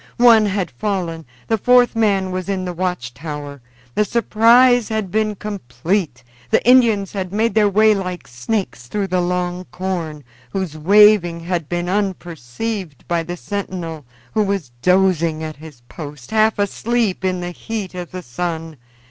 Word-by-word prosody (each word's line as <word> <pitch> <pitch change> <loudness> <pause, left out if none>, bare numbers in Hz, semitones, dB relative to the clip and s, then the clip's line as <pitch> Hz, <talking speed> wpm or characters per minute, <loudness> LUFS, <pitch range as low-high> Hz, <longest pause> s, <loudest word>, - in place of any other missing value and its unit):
One 230 -3 +6
had 195 -2 -2
fallen. 165 - -3 0.2
The 225 -1 +1
fourth 245 +2 +4
man 200 -4 +1
was 185 +1 -4
in 190 -2 -1
the 180 - -4
watch 175 -8 -3
tower. 145 0 -7 0.3
The 210 - +2
surprise 235 +2 +4
had 215 -4 -2
been 215 0 0
complete. 170 - -3 0.3
The - - +2
Indians 230 -6 +5
had 190 -3 -4
made 220 +2 +1
their 210 -1 +4
way 215 +2 +5
like 185 -3 -4
snakes 120 - -3
through 200 +9 -2
the 180 0 +1
long 180 0 -2
corn, 170 -6 -4 0.3
whose 185 -5 -3
waving 185 0 +5
had 170 -3 -3
been 175 0 -2
unperceived 180 - -4
by 170 -1 +1
the 175 +2 -6
sentinel, 175 -6 -5 0.3
who 215 - +2
was 195 -10 -1
dozing 175 -3 +2
at 155 -2 -6
his 150 -5 -13
post, 145 0 -10
half 220 0 +3
asleep 210 0 0
in 185 -1 0
the 175 0 -4
heat 210 0 -5
of 180 -1 -6
the 185 0 -7
sun. 165 +3 -4
185 Hz, 155 wpm, -19 LUFS, 165-210 Hz, 0.3 s, One